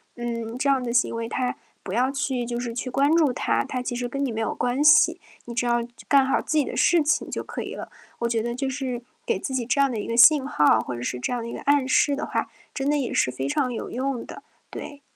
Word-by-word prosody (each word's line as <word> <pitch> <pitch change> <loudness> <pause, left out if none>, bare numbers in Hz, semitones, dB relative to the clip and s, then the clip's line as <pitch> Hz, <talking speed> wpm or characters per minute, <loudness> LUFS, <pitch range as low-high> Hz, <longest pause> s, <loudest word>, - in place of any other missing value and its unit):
嗯， 235 -1 -4
这 280 +2 -1
样 270 -2 +3
的 240 - -3
行 240 -1 +2
为， 230 0 -4
它 250 -1 -1 0.3
不 190 - -6
要 250 +3 +2
去 270 -3 -2
就 240 0 -3
是 240 -1 -4
去 255 +2 -4
关 280 +5 +2
注 305 -6 +4
它。 - - 0
它 255 - -4
其 245 - -3
实 245 0 -3
跟 275 +2 -2
你 255 - -2
没 225 - -3
有 225 - -2
关 245 +4 0
系， 300 0 +6 0.3
你 235 - -7
只 245 +1 -1
要 240 0 +2
就 235 - -12 0.2
干 275 -2 +5
好 265 - +1
自 310 - -1
己 290 - +3
的 - - -6
事 335 -3 +4
情 305 +1 0
就 - - -4
可 - - -6
以 - - -6
了。 - - -8 0.3
我 235 - 0
觉 230 -1 0
得 235 +1 -3
就 270 +2 -2
是 255 -3 -4 0.2
给 465 - +1
自 265 - -5
己 245 -3 -1
这 255 +4 0
样 275 -1 +3
的 225 - -3
一 - - -5
个 230 - -2
信 275 +2 +7
号， 145 - +3
或 125 - -5
者 120 - -6
是 125 - -3
这 125 - -3
样 245 - -1
的 - - -6
一 - - -6
个 - - -6
暗 285 -2 +2
示 280 +2 +3
的 295 - -3
话， - - -2 0.3
真 275 0 -1
的 295 - +2
也 265 -4 -2
是 - - +2
非 130 +2 -4
常 250 - 0
有 230 - -5
用 260 0 -2
的， - - -10 0.3
对。 285 -1 -8
250 Hz, 305 characters per minute, -24 LUFS, 235-275 Hz, 0.3 s, 信